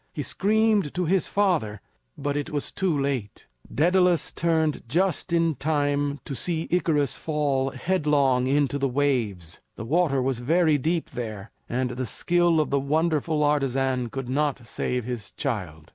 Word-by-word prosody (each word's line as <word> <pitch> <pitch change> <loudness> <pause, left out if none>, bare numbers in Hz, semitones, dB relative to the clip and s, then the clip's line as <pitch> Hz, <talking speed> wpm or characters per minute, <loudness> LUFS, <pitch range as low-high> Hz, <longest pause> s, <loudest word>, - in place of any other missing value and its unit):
He - - -3
screamed 215 -5 +1
to 180 0 0
his 185 +3 +1
father, 170 - 0 0.4
but 145 0 -2
it 145 -1 -2
was 145 -2 -3
too 180 -7 0
late. 135 -7 -3 0.3
Daedalus 180 +1 +2
turned 160 -3 +1
just 180 +3 0
in 165 -1 +2
time 145 0 0
to 140 - -5
see 165 +4 -2
Icarus 150 -6 +1
fall 145 -4 0
headlong 140 -4 +1
into 140 0 +1
the 135 0 +1
waves. 115 - -1
The 115 - -7
water 150 0 +2
was 130 -1 -1
very 155 +3 +2
deep 165 +4 -1
there, 110 -4 -6 0.2
and 125 +1 -1
the 125 0 -4
skill 175 +6 +2
of 155 - 0
the 140 - +2
wonderful 155 +1 0
artisan 135 -4 +1
could 135 +1 -5
not 135 -1 -1
save 125 +1 -3
his 120 -4 -5
child. 90 - -4
145 Hz, 155 wpm, -25 LUFS, 130-165 Hz, 0.4 s, Daedalus